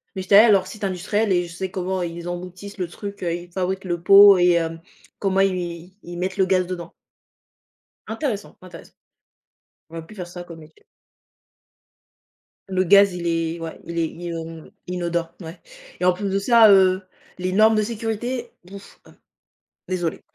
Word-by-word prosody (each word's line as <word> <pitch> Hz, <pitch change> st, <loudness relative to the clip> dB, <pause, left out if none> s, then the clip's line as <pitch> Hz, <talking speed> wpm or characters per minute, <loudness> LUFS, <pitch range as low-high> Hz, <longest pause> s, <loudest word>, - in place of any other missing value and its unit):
Mais 190 Hz, -, -3 dB
j'étais 200 Hz, -, +3 dB
allée 215 Hz, +3 st, +9 dB
à -, -, +5 dB
leur 190 Hz, -2 st, +3 dB
site 205 Hz, +2 st, -10 dB
industriel 195 Hz, +3 st, -1 dB
et 175 Hz, -1 st, +2 dB
je 170 Hz, -, -11 dB
sais 190 Hz, +2 st, -4 dB
comment 185 Hz, 0 st, -3 dB
ils 170 Hz, 0 st, -5 dB
emboutissent 180 Hz, +3 st, -7 dB
le 180 Hz, -2 st, -3 dB
truc, 200 Hz, +3 st, -9 dB
heu, 170 Hz, -, -1 dB
ils 175 Hz, +1 st, -7 dB
fabriquent 190 Hz, +1 st, -3 dB
le 175 Hz, -2 st, -3 dB
pot 200 Hz, +1 st, +8 dB
et 175 Hz, 0 st, +4 dB
hem, 165 Hz, -1 st, -2 dB, 0.4 s
comment 195 Hz, -1 st, +1 dB
i 195 Hz, -, +4 dB
ils 175 Hz, -1 st, -6 dB
ils 175 Hz, 0 st, -8 dB
mettent 185 Hz, +2 st, -3 dB
le 190 Hz, -, +3 dB
gaz 185 Hz, -1 st, +1 dB
dedans 175 Hz, -2 st, -7 dB, 1.2 s
Intéressant, 220 Hz, -3 st, -4 dB
intéressant. 185 Hz, -1 st, -13 dB, 1.0 s
J'aurais 165 Hz, 0 st, -9 dB
pu 215 Hz, -, -14 dB
faire 180 Hz, -4 st, -7 dB
ça 175 Hz, 0 st, -9 dB
comme 170 Hz, -2 st, -11 dB
métier. 155 Hz, 0 st, -18 dB, 1.9 s
Le 185 Hz, -1 st, +1 dB
gaz, 200 Hz, +1 st, +5 dB
il 175 Hz, -1 st, -6 dB
est 165 Hz, 0 st, -1 dB
ouais. 165 Hz, -1 st, -7 dB
Il 170 Hz, 0 st, -7 dB
est 165 Hz, -1 st, +1 dB
il 170 Hz, -, -13 dB
inon 165 Hz, -1 st, -7 dB, 0.2 s
inodore, 175 Hz, -2 st, -3 dB
ouais. 165 Hz, +1 st, -9 dB, 0.4 s
Et -, -, +1 dB
en 180 Hz, -, +6 dB
plus 195 Hz, +2 st, -4 dB
de 195 Hz, -, 0 dB
ça, 225 Hz, +2 st, +6 dB
heu, 190 Hz, -1 st, +5 dB, 0.4 s
les 185 Hz, 0 st, -3 dB
normes 220 Hz, +2 st, +5 dB
de 215 Hz, -, +2 dB
sécurité? 230 Hz, +2 st, -4 dB
Bouf, 195 Hz, +2 st, -13 dB
heu. -, -, -18 dB, 0.8 s
Désolée. 175 Hz, -3 st, -2 dB
185 Hz, 185 wpm, -22 LUFS, 170-200 Hz, 1.9 s, allée